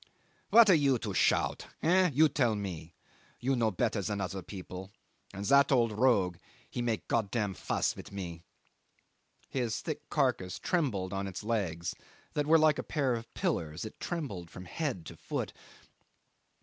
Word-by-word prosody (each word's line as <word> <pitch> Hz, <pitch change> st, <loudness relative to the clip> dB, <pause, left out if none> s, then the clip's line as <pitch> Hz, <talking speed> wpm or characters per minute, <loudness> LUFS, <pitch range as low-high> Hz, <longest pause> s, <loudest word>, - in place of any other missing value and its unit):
"What 230 Hz, 0 st, +8 dB
are 190 Hz, -, +7 dB
you 140 Hz, -5 st, +4 dB
to 105 Hz, -3 st, -4 dB
shout? -, -, +2 dB, 0.2 s
Eh? 180 Hz, +2 st, +5 dB
You 155 Hz, +4 st, +5 dB
tell 130 Hz, -7 st, +1 dB
me? 85 Hz, -5 st, -6 dB, 0.4 s
You 135 Hz, +2 st, +1 dB
no 115 Hz, -3 st, +2 dB
better 110 Hz, +1 st, 0 dB
than 100 Hz, +1 st, -2 dB
other 95 Hz, 0 st, -3 dB
people, 95 Hz, 0 st, -8 dB, 0.4 s
and 100 Hz, +1 st, -6 dB
that 140 Hz, +5 st, +5 dB
old 120 Hz, -4 st, +4 dB
rogue 105 Hz, -6 st, +3 dB, 0.3 s
he 120 Hz, -, -4 dB
make 115 Hz, -3 st, -1 dB
Gottam 105 Hz, -2 st, 0 dB
fuss -, -, -1 dB
with -, -, -10 dB
me." 85 Hz, -4 st, -6 dB, 1.1 s
His 120 Hz, -4 st, -1 dB
thick 150 Hz, -2 st, -5 dB
carcass 125 Hz, -11 st, 0 dB
trembled 105 Hz, -, 0 dB
on 100 Hz, 0 st, -2 dB
its 95 Hz, +1 st, -6 dB
legs 95 Hz, -7 st, -1 dB, 0.4 s
that 150 Hz, 0 st, 0 dB
were 165 Hz, +1 st, +7 dB
like 155 Hz, -3 st, +4 dB
a -, -, -2 dB
pair 140 Hz, -5 st, 0 dB
of 115 Hz, 0 st, -5 dB
pillars; 80 Hz, +4 st, -1 dB
it 110 Hz, -, -9 dB
trembled 115 Hz, -, -4 dB
from 90 Hz, +2 st, -10 dB
head 125 Hz, -, -3 dB
to -, -, -9 dB
foot. -, -, -4 dB
110 Hz, 160 wpm, -31 LUFS, 95-140 Hz, 1.1 s, What